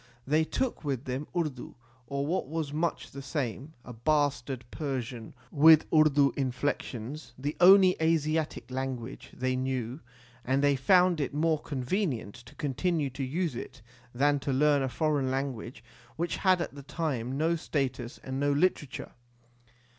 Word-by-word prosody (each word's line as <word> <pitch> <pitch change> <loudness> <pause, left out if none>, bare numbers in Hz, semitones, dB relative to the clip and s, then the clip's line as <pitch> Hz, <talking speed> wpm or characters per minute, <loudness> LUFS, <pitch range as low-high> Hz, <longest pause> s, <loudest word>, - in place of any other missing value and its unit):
They 155 +3 +3
took 260 +5 -2
with 140 -3 -2
them 130 +3 -4
Urdu, 150 -7 -3 0.3
or 140 +1 -2
what 165 -2 -1
was 155 -1 -3
much 165 +2 -2
the 140 - -8
same 140 +1 -4
a 125 - -8
bastard 135 -1 0
Persian 125 -6 -4 0.2
with 160 +1 +7
Urdu 145 -3 +5
inflec 135 +1 -1
tions 130 +6 -8
the 145 +4 -3
only 185 0 +8
Asiatic 155 -5 0
language 130 -1 -5
they 130 0 -1
knew, 130 0 -2 0.4
and 135 +2 +1
they 145 -1 +4
found 180 +4 +4
it 140 0 -3
more 160 0 +2
convenient 135 - -2
to 120 -1 -15
continue 150 +1 -1
to 135 +2 -4
use 160 +4 -1
it 115 - -8 0.3
than 145 +3 +2
to 140 - -2
learn 145 +1 +3
a 135 - -1
foreign 140 +2 0
language 130 -2 -4 0.3
which 170 +2 -2
had 185 -2 +3
at - - -4
the 140 - -9
time 135 -4 -3
no 165 +3 +2
status 135 -6 -3
and 130 0 -4
no 145 0 +2
literature. 150 -2 0
140 Hz, 155 wpm, -29 LUFS, 130-155 Hz, 0.4 s, only